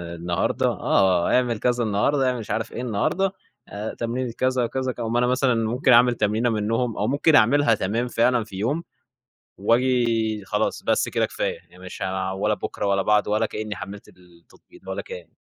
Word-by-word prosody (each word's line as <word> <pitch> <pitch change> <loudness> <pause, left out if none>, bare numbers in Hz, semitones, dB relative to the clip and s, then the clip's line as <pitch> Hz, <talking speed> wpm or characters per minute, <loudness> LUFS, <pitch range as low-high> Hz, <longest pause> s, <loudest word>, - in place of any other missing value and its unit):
النهارده، 85 +1 -1
آه، 90 -3 +2
أعمل 120 -3 +1
كذا 125 -1 +1
النهارده، 125 +6 +1
أعمل 125 -1 -2
مش 110 -1 -7
عارف 115 +2 -2
إيه 120 - -5
النهارده، 125 - 0 0.4
آآ، 105 +2 -5
تمرين 120 +2 -3
الكذا 130 +2 0
أو 115 - 0
كذا. 130 -1 -2
اقوم 115 0 -1
أنا 125 - +2
مثلًا 125 0 +2
ممكن 115 +4 +1
أعمل 120 0 +6
تمرينة 110 +3 +1
منهم، 115 +2 -1
أو 105 - 0
ممكن 145 +3 +3
أعملها 125 0 +4
تمام 110 +5 -1
فعلًا 120 0 +2
في 105 -3 -12
يوم 140 - -1 0.7
وآجي 115 -1 +1
خلاص - - -1
بس - - +1
كده - - +1
كفاية، - - -3
يعني 90 +1 -17
مش 95 - -9
عا 95 0 -2
ولا 100 +3 0
بُكرة 105 - -4
ولا 100 -1 +2
بعده 105 0 +2
ولا 110 +1 +2
كأني 105 -1 -5
حملت 100 +3 -9
التطبيق 90 - -21
ولا - - -3
كان. 480 +1 -9
115 Hz, 185 wpm, -23 LUFS, 105-125 Hz, 0.7 s, أعمل